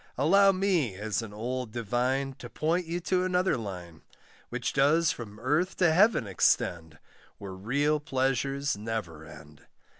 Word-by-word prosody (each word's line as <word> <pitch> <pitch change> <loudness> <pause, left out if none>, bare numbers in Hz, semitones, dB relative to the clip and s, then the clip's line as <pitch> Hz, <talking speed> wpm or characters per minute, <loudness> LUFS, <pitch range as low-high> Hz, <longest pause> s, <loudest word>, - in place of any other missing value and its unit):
Allow 195 +9 +5
me, 185 - 0
as 105 +3 -2
an 110 -2 -8
old 120 +2 -4
divine, 125 +4 -1
To 120 - -9
point 165 +6 -1
you 170 +2 -2
to 180 +1 0
another 185 0 +1
line, 90 -7 -7 0.5
Which - - -3
does 150 +4 +3
from 105 -3 -8
earth 150 +10 0
to 170 -4 +3
heaven 200 - +4
extend, 85 -4 0 0.4
Where 100 -2 -8
real 140 +10 0
pleasures 135 -1 -1
never 105 -7 -5
end. 75 0 -15
130 Hz, 145 wpm, -28 LUFS, 105-160 Hz, 0.5 s, Allow